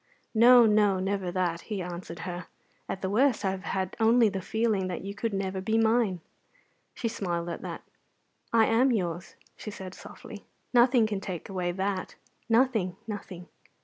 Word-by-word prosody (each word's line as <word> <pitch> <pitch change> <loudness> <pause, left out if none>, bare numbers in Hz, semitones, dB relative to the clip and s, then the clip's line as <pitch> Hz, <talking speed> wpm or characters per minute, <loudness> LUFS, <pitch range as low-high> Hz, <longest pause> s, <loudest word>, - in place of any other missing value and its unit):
"No, 240 +1 +8
no, 210 -3 +3
never 190 -1 -1
that," 175 -2 -1
he 210 -3 -5
answered 175 -2 -6
her. 175 0 -6 0.4
"At 190 - -4
the 190 - 0
worst 235 -1 +2
I 190 - +2
have 190 0 -6
had 190 -1 -2
only 225 0 +5
the 195 -1 -4
feeling 220 -1 0
that 180 - -4
you 200 +1 -5
could 225 +2 -2
never 195 -1 -2
be 220 +3 0
mine." 220 -5 +2 0.7
She 235 - -2
smiled 175 -6 -3
at 170 - -5
that. - - -6 0.7
"I 225 -1 +5
am 245 +4 +3
yours," 175 -6 -2 0.2
she - - -8
said 190 -3 -8
softly; - - -11 0.3
"nothing 245 -1 +5
can 205 -3 -3
take 185 -2 -6
away 180 -2 -2
that 190 +1 -3 0.3
nothing, 225 -6 +2
nothing. 195 -5 -7
195 Hz, 170 wpm, -28 LUFS, 185-225 Hz, 0.7 s, No